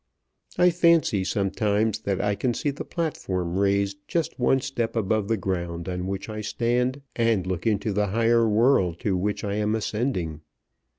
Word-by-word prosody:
I 180 0 +5
fancy 165 - +3
sometimes 105 +2 0
that 100 -3 -2
I 105 0 +1
can 120 +3 -1
see 145 - -1
the 140 - -6
platform 95 - -3
raised 100 0 +1
just 165 -4 -2
one 130 +2 +3
step 120 -3 -3
above 110 -1 0
the 115 0 +1
ground 85 -2 -3
on 90 0 -3
which 95 0 -4
I 110 -1 -5
stand, 125 +5 -1
and 115 -5 +1
look 95 +3 -2
into 105 -1 0
the 105 +1 +1
higher 115 +2 +3
world 105 -6 +3
to 100 -3 0
which 100 +3 -1
I 100 -1 -2
am 105 +1 +1
ascending. 105 - -2
105 Hz, 170 wpm, -25 LUFS, 95-120 Hz, -, I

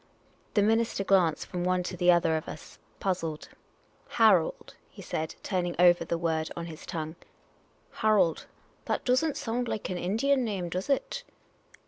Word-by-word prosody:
The 205 - +4
minister 225 -1 +1
glanced 180 -6 +2
from 180 -1 -4
one 180 0 +1
to 180 - -5
the 180 0 +4
other 165 -2 +3
of 155 - -3
us, - - -10 0.2
puzzled. 165 -5 -2 0.3
" - - -35
Harold? 210 -8 +3
" - - -35
he - - -12
said, 155 0 -3
turning 180 -3 -1
over 175 0 +5
the 170 - -2
word 160 -2 -1
on 170 - -4
his 160 -2 -10
tongue. 160 -2 -4 0.4
" - - -36
Harold? 210 -7 +3 0.4
That - - -2
does 255 +4 +3
n't 315 -3 -1
.sound 240 +2 -2
like 215 -4 -3
an 180 - -3
Indian 255 +9 +1
name, 195 -6 -3
does 185 +8 -4
it? 385 - -1
180 Hz, 175 wpm, -28 LUFS, 170-220 Hz, 0.4 s, over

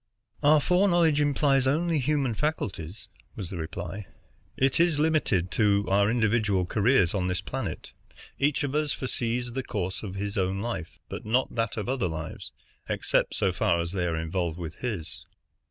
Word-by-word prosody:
"Our 150 +1 +6
foreknowledge 175 -3 +3
implies 140 -2 +2
only 160 +3 +2
human 140 -2 +1
faculties," 100 - -3 0.3
was 100 -8 -6
the 95 - -4
reply. 85 +4 -5 0.5
"It 135 +2 +2
is 170 -3 +3
limited 145 - +1
to 100 -2 +3
our 100 +1 +4
individual 110 -5 +2
careers 105 -2 +3
on 95 -3 0
this 90 -1 0
planet. - - -5 0.5
Each 145 +2 +2
of 140 -1 -2
us 150 -1 +1
foresees 120 -1 -2
the 130 +3 -2
course 95 -6 -3
of 95 -3 -6
his 100 +1 -2
own 95 +1 0
life, 105 -6 -4
but - - -6
not 120 +5 +1
that 115 -2 -1
of 105 - -3
other 125 -7 0
lives, 80 -1 -6 0.4
except - - 0
so 95 - +2
far 85 -1 +1
as 85 0 -2
they 90 -2 -1
are 80 -1 -1
involved 80 0 -2
with 85 -2 -6
his." 105 -11 -5
110 Hz, 170 wpm, -27 LUFS, 90-140 Hz, 0.5 s, Our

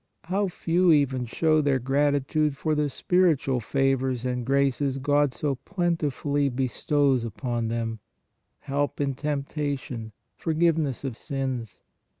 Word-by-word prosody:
How 195 +4 0
few 175 0 +2
even 135 -5 +2
show 155 +5 +2
their 140 -2 +2
gratitude 145 +2 +1
for 155 +2 0
the 150 -1 +1
spiritual 155 -5 +2
favors 130 0 0
and 125 -1 -1
graces 135 +1 +1
God 145 +1 +2
so 140 +4 -1
plentifully 145 -2 -1
bestows 135 +1 +1
upon 115 +1 -3
them; 115 -1 -2 0.6
help 145 +1 -2
in 140 -1 0
temptation, 140 -4 -3 0.2
forgiveness 160 -5 0
of 135 -4 -3
sins. 130 -5 -4
140 Hz, 120 wpm, -26 LUFS, 130-150 Hz, 0.6 s, few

